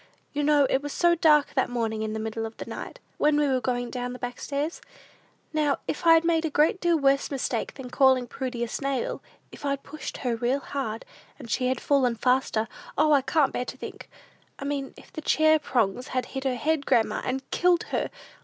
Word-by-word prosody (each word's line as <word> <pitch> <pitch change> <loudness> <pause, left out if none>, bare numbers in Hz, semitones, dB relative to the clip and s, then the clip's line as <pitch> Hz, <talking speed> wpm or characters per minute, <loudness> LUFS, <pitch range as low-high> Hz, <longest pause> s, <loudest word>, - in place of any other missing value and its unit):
You 295 - -1
know 290 -1 +4
it 265 - +1
was 290 0 -5
so 345 0 +4
dark 305 -3 +4
that 260 - +1
morning 225 -3 -2
in 215 0 -2
the 220 - -3
middle 220 +1 -3
of 220 - -13
the - - -6
night, - - -7 0.2
when 300 0 +4
we 295 -1 +3
were 260 -2 +1
going 245 -1 -2
down 250 -1 -3
the - - -7
back 245 -1 -5
stairs? 290 +3 -3 0.7
Now, 300 -2 +2
if 335 - -2
I'd 330 0 +7
made 330 -1 +2
a 320 - 0
great 310 +7 +2
deal 345 -1 +3
worse 275 -1 +2
mistake 260 -4 -2
than 255 -3 -8
calling 260 -2 +4
Prudy 250 -1 -4
a - - -1
snail, 270 +1 -2 0.3
if - - -12
I'd 280 -1 -1
pushed 305 +1 -7
her 245 -3 -1
real 245 +4 0
hard, 265 -5 -4 0.3
and 230 - -9
she 255 +3 +1
had 255 -1 0
fallen 260 -4 +2
faster, 240 -2 +1 0.3
O, 305 - +4
I 285 -2 +5
can't 295 +1 +2
bear 250 - -2
to - - -7
think! - - -9 0.5
I 275 - -6
mean, 280 -1 -3
if - - -16
the 315 - -5
chair 315 +1 +4
prongs 250 -4 0
had 255 -1 -1
hit 265 0 -6
her 260 -2 +1
head, 300 +3 0
grandma 225 - +2
and 260 +1 -3
killed 355 -1 +3
her! - - 0
270 Hz, 220 wpm, -26 LUFS, 245-295 Hz, 0.7 s, I'd